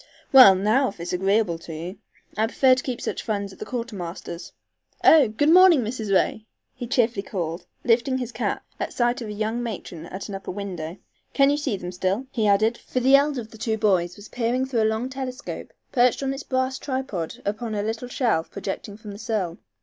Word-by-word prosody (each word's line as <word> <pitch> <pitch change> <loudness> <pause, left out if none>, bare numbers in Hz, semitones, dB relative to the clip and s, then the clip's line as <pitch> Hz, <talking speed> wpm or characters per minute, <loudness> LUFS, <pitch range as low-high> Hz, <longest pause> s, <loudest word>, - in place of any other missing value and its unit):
"Well, 255 -9 +10
now, 215 +8 +2
if 170 +1 -5
agreeable 190 -1 +1
to 165 -1 -8
you. 175 +5 -7 0.4
I 220 +1 +1
prefer 260 +2 +4
to 255 - 0
keep 250 -3 -3
such - - -3
funds 200 -3 -3
at - - -17
the - - -6
quartermaster's. 195 -8 -6 0.5
Oh 305 -5 +7
Good 260 +9 +2
morning, 355 -6 +7
Mrs. 220 -2 -4
Ray!" 215 +3 +1 0.3
he 245 -2 -6
cheerily 235 -3 +1
called, 175 -3 -4 0.2
lifting 245 +2 +2
his 250 -2 -4
cap, 230 +1 -3
at - - -3
sight 240 +1 +1
of 225 - -5
a - - -4
young 220 +3 -2
matron 185 -7 -6
at 190 +3 -7
an 205 - -7
upper 195 - -6
window. 180 -3 -5 0.4
"Can 275 0 +5
you 290 - +1
see 275 -8 -1
them 180 -1 -6
still?" 190 +7 -1
he 220 -3 0
added, 215 +3 +3
for 255 - -3
the 265 +2 +6
elder 280 -2 +2
of 220 0 -12
the 220 - -13
two 220 0 -1
boys 185 -5 +1
was 205 0 -12
peering 245 +2 0
through 250 -4 0
a - - +3
long 220 +3 -1
telescope, 260 0 -6 0.2
perched 250 +1 +3
on 270 0 0
its 270 - -6
brass 260 -1 -1
tripod 260 - -3
upon 215 +2 -2
a 205 - -1
little 225 +3 -3
shelf 230 -10 0
projecting 200 +1 -6
from 215 -1 -9
the 200 - -9
sill. 205 -6 -2
220 Hz, 210 wpm, -24 LUFS, 195-255 Hz, 0.5 s, Well